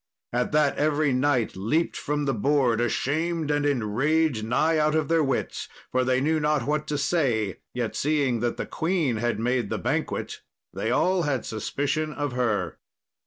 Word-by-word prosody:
At 125 0 0
that 150 -2 +2
every 150 -1 +2
knight 130 -3 +1
leapt 130 - 0
from 145 0 -2
the 135 - +1
board 125 0 +2
ashamed 155 +6 0
and 145 0 +1
enraged 135 +2 +1
nigh 155 +8 +2
out 155 0 +2
of 155 -3 0
their 165 -1 +3
wits, 135 -2 -2 0.2
for 130 0 +2
they 130 0 +2
knew 155 +3 +1
not 150 -4 +1
what 150 +1 -1
to 150 - -1
say, 120 - 0 0.2
yet 120 -3 -2
seeing 140 -5 +1
that 120 +1 -1
the - - -3
queen 160 -8 0
had 120 0 -1
made 120 -2 0
the - - -1
banquet - - -2 0.3
they 110 - -2
all 180 +9 +2
had 145 -6 -1
suspicion 145 +7 -2
of 145 -2 -2
her. 115 -7 -1
140 Hz, 170 wpm, -26 LUFS, 120-155 Hz, 0.3 s, their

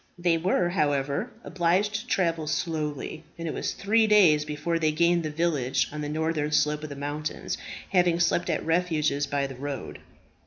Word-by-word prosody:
They 175 -1 +2
were, 175 +1 +1
however, 145 - 0
obliged 185 +4 +1
to 215 +4 -4
travel 165 -8 0
slowly, 155 -1 -3
and 165 0 -5
it - - -2
was - - -2
three 220 +2 +2
days 175 -8 +5
before 150 +3 -2
they 155 -1 +2
gained 170 +2 +3
the 155 - -3
village 150 -5 0
on 150 0 -5
the 145 - -3
northern 155 -1 -1
slope 150 0 +2
of 155 - -6
the 140 - -7
mountains, 145 +2 -4 0.3
having 175 -3 +3
slept 170 +1 +1
at - - -1
refuges 160 -4 +1
by 140 -1 0
the 135 - -6
road. 140 +2 -6
160 Hz, 180 wpm, -26 LUFS, 150-175 Hz, 0.3 s, days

